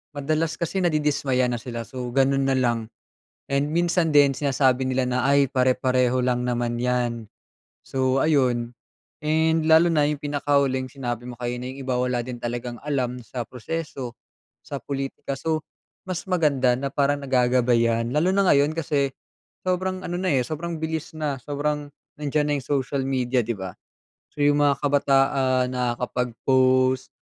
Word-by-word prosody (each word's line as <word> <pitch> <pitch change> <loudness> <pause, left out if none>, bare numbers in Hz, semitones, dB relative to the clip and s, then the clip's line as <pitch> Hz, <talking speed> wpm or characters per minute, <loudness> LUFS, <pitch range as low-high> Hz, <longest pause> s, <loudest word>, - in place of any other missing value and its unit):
madalas 155 +3 -1
kasi 170 +3 -1
nadidismaya 145 -6 +1
na 125 - -1
sila. 115 0 -5
So, 130 -1 -6
ganun 135 0 +3
nalang. 120 -4 +1 0.6
And 140 +1 +1
minsan 175 0 +2
din 145 -1 +6
sinasabi 135 -2 +2
nila 130 0 +1
na, 125 0 0
"Ay, 140 -1 +4
pare-pareho 130 -1 +2
lang 125 -1 0
naman 120 -1 -1
yan," 120 -3 -1 0.6
so 130 0 +1
ayun. 125 -6 +2 0.5
And 160 +1 +2
lalo 160 +2 +6
na 150 -3 +3
yung 150 -1 -2
pinakahuling 140 -3 0
sinabi 120 -3 -4
mo 120 - -7
kanina, 125 +1 -3
yung 135 - -10
iba 130 - +1
wala 125 -1 0
din 120 0 -7
talagang 120 0 -3
alam 130 -4 -1
sa 120 +2 -5
proseso, 130 -1 -5 0.5
sa 140 - -6
pulitika, 135 0 -4
so, 160 -1 0 0.5
mas 185 -2 -3
maganda 145 -8 +2
na 140 - -2
parang 145 0 +1
nagagabayan, 120 -3 +2
lalo 170 +5 +3
na 200 - +4
ngayon 145 -2 +4
kasi 145 -4 0 0.6
sobrang 185 +1 -1
ano 175 - -3
na 185 - -1
eh, 130 - +2
sobrang 165 +5 -4
bilis 160 0 -3
na, 150 -4 -2
sobrang 145 +2 -2 0.3
nandiyan 150 0 0
na - - +2
yung 130 - -13
social 140 -1 0
media, 130 -1 +1
di 115 0 -1
ba? 95 -2 -6 0.6
So, 145 - -1
yung 145 0 +4
mga 140 -1 +4
kabataan 135 -2 +2
nakakapag-post, 130 +1 +1
135 Hz, 150 wpm, -24 LUFS, 125-150 Hz, 0.6 s, din